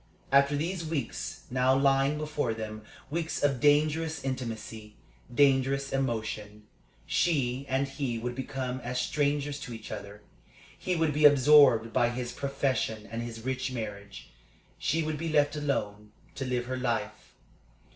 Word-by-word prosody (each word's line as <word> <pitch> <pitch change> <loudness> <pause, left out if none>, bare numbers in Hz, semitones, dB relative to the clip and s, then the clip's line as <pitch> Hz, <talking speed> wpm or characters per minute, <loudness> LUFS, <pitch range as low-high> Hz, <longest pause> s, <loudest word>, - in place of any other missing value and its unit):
After 140 +1 +5
these 170 +4 -2
weeks 155 -6 -4
now 130 +1 +3
lying 135 +1 +3
before 150 -6 -2
them 110 -1 -6 0.3
weeks 160 -1 -2
of 140 -3 +2
dangerous 155 +2 +2
intimacy, 115 -5 -5 0.4
dangerous 135 +1 +2
emotion 110 -5 -3 0.4
she 135 -5 0
and 135 +1 +1
he 135 -3 -3
would 120 +2 -3
become 130 -1 -4
as 125 0 -3
strangers 145 +1 0
to 125 -4 -7
each 110 - -10
other. 100 +1 -8 0.5
He 185 - -2
would 160 -2 +1
be 150 +1 +3
absorbed 140 -5 +6
by 120 -2 +3
his 120 0 -4
profession 135 -6 -2
and 115 0 -3
his 115 -1 -7
rich 130 0 -2
marriage. 100 -4 -7 0.5
She 160 +2 0
would 155 -1 -3
be 165 0 -2
left 145 -1 +2
alone 105 -8 -2 0.2
to 135 - -4
live 125 -1 -1
her 130 +1 -3
life. 125 -2 -3
135 Hz, 145 wpm, -29 LUFS, 120-145 Hz, 0.5 s, absorbed